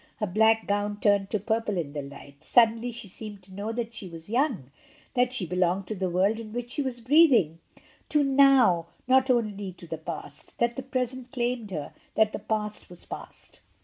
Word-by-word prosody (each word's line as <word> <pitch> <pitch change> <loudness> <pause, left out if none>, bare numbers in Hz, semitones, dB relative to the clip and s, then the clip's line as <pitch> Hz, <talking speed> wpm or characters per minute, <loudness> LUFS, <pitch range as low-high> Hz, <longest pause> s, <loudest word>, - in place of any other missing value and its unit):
Her 215 - -1
black 220 +3 +3
gown 205 0 -1
turned 200 -2 +3
to 210 - 0
purple 220 -1 -1
in 150 -5 -3
the 145 - -3
light. 140 +1 -12
Suddenly 230 0 +4
she 235 -2 -9
seemed 205 0 -8
to 190 +1 -16
know 205 +3 -4
that 230 0 -4
she 200 -5 -8
was 165 +3 -11
young, 235 - 0 0.4
that 250 0 +2
she 245 -7 -3
belonged 180 +2 0
to 215 - -2
the 185 -1 -1
world 195 +5 +2
in 215 -2 -8
which 240 0 -4
she 290 - -2
was 255 -3 -4
breathing, 245 - +5 0.5
to 295 -1 +3
noWy 265 -11 +5 0.2
not 260 +1 +4
only 205 -6 0
to 175 - -13
the 160 -1 -6
past; 155 -3 -8
that 235 0 +1
the - - -3
present 255 -1 -3
claimed 240 -4 -2
her, 155 -6 -5 0.2
that 215 -1 +3
the - - -3
past 210 -1 -3
was 175 - -14
past. - - -10
215 Hz, 200 wpm, -27 LUFS, 185-245 Hz, 0.5 s, breathing